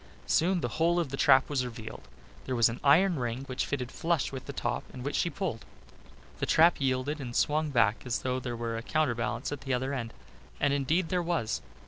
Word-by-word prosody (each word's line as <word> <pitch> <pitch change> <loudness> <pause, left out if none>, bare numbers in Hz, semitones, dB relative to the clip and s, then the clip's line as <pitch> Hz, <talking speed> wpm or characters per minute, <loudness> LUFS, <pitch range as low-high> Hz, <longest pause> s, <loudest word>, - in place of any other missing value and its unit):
Soon 180 +2 +2
the - - 0
whole 170 +1 +3
of 165 -5 -1
the 135 - -4
trap 135 -1 +5
was 140 -3 0
revealed. 115 -3 -8 0.4
There 130 - -2
was 115 -1 +5
an 115 - -6
iron 165 +4 +5
ring, 120 +1 -3
which 130 -2 -3
fitted 130 -4 -3
flush 165 -4 0
with 135 -2 -7
the - - -4
top 120 -3 -2
and 125 0 -8
which 145 - -2
she 170 - +1
pulled. 160 - -4 0.8
The - - -1
trap 165 -1 +5
yielded 135 +3 0
and 120 -3 -6
swung 155 +1 +1
back 115 -5 +2
as 125 -2 -2
though 130 0 0
there 120 -2 -4
were 115 -1 -3
a - - -4
counterbalance 120 -3 -1
at 145 -2 -5
the 135 -2 -1
other 130 +2 -2
end, 115 -4 -3 0.5
as 145 - +2
indeed 155 +5 +1
there 180 -1 +1
was. 165 -10 -1
135 Hz, 215 wpm, -29 LUFS, 120-155 Hz, 0.8 s, trap